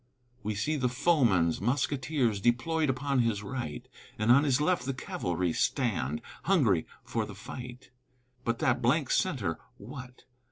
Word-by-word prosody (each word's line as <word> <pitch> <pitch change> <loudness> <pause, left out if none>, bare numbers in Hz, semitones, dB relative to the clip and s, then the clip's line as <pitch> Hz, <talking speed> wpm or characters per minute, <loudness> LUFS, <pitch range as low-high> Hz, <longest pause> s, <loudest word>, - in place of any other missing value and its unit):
We 105 0 -3
see 145 +10 0
the 125 -3 +1
foeman's 120 - +2
musketeers 125 -1 0
Deployed 150 +7 +1
upon 135 +1 0
his 115 -4 +1
right, 110 - -5 0.3
And 110 +2 +3
on 140 +4 +6
his 135 -2 +3
left 175 +1 +1
the 135 0 -2
cavalry 90 -7 -2
Stand, 95 - 0 0.2
hungry 125 - +3 0.2
for - - -2
the - - -8
fight; 125 0 -9 0.5
But 115 -1 0
that 130 0 +1
blank 130 +4 +2
centre 115 - 0 0.2
what? 125 +3 -10
125 Hz, 145 wpm, -30 LUFS, 105-140 Hz, 0.5 s, on